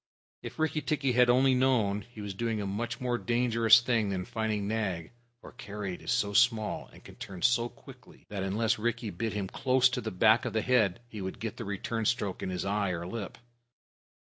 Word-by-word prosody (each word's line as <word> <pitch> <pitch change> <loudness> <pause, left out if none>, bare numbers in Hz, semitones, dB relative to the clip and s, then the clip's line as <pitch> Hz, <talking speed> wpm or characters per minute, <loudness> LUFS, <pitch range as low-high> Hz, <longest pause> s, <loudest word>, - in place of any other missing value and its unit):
If - - -8
Rikki 155 -1 0
tikki 145 -4 0
had 125 0 +4
only 130 +2 +5
known, 120 -6 +2
he 110 +1 -12
was 100 -1 -5
doing 115 +2 -2
a 100 - -3
much 115 +5 -3
more 125 -1 -1
dangerous 115 -1 +4
thing 115 -4 +1
than 95 -2 -2
fighting 110 -2 -2
Nag, 95 -7 -2 0.3
for - - -12
Karait 105 -7 -6
is - - -3
so 105 -5 +1
small, 115 -1 +2
and - - -16
can - - -14
turn 95 -3 -8
so 120 0 +3
quickly, - - -16
that 100 -2 -5
unless 110 +4 0
Rikki 120 -1 -2
bit 110 +5 -3
him 100 -2 -2
close 130 +5 +3
to 125 0 -3
the 110 - -3
back 110 +4 +4
of 120 - -3
the 110 - 0
head, 110 -6 +2
he 110 -3 -8
would 95 0 -5
get 110 -2 -5
the - - -5
return 110 +3 -3
stroke 105 -5 -1
in - - -3
his 90 0 -3
eye 100 0 0
or 85 -1 -3
his 90 - -7
lip. 110 -4 -5
110 Hz, 215 wpm, -30 LUFS, 100-120 Hz, 0.3 s, only